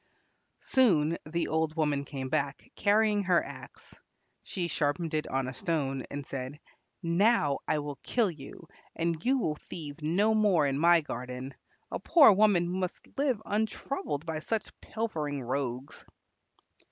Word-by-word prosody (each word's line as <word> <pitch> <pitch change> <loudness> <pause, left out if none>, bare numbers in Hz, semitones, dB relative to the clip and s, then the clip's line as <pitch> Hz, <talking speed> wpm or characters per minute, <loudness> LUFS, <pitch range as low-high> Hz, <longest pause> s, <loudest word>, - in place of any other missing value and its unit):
Soon 170 - +3
the 170 +2 -1
old 160 0 0
woman 150 -3 0
came 135 -2 -5
back, 140 +2 -2
carrying 210 0 +3
her 180 -2 +3
axe. - - -11 0.5
She 180 -3 -3
sharpened 160 +1 -1
it 155 0 -1
on 135 -1 -1
a 130 - -5
stone 135 -4 -2
and 145 0 -5
said, 135 +2 -6 0.4
"Now 170 -4 +3
I - - +2
will 145 -1 -4
kill 225 -6 0
you, 155 +2 -11 0.3
and 165 -1 -1
you 265 +2 +3
will 155 - -1
thieve 150 -2 -7
no 190 +8 +2
more 205 -8 +3
in 140 0 0
my 170 +1 +6
garden. 125 0 -6 0.4
A - - -2
poor 295 -9 +7
woman 195 -4 +4
must 185 -1 -4
live 265 -6 0
untroubled 210 - -2
by 160 -1 -3
such 220 +7 -3
pilfering 155 - -3
rogues." 130 +1 -4
160 Hz, 145 wpm, -29 LUFS, 145-200 Hz, 0.5 s, poor